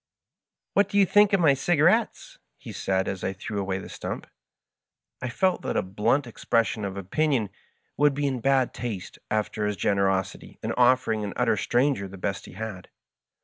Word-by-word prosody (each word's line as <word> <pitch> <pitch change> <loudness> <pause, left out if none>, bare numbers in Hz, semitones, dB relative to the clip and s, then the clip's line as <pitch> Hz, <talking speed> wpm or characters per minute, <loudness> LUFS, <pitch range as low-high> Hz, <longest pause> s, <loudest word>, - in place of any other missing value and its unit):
" - - -64
What 200 0 +3
do 200 - -1
you 200 - +6
think 205 +2 +5
of 195 - +3
my 160 -5 +5
cigarettes? 175 - +1
" - - -53
he - - -10
said, 95 -1 -1
as 95 - -4
I 95 - -1
threw 100 +2 -5
away 95 -1 -2
the 95 - -8
stump. - - -6 1.0
I 130 - -3
felt 185 +9 +1
that - - -2
a - - +1
blunt 105 +9 +1
expression 115 -2 0
of 95 0 -5
opinion 115 +2 0 0.5
would 145 -1 +3
be 145 0 -1
in 130 -3 -1
bad 135 0 +2
taste 110 -7 -6
after 105 0 -1
his 105 -1 -2
generosity 95 -1 0
in - - -1
offering 125 -3 +3
an 100 - -4
utter - - +2
stranger 125 -5 +1
the 95 +1 -10
best - - -3
he - - -12
had. 100 -2 -7
115 Hz, 190 wpm, -26 LUFS, 100-145 Hz, 1.0 s, you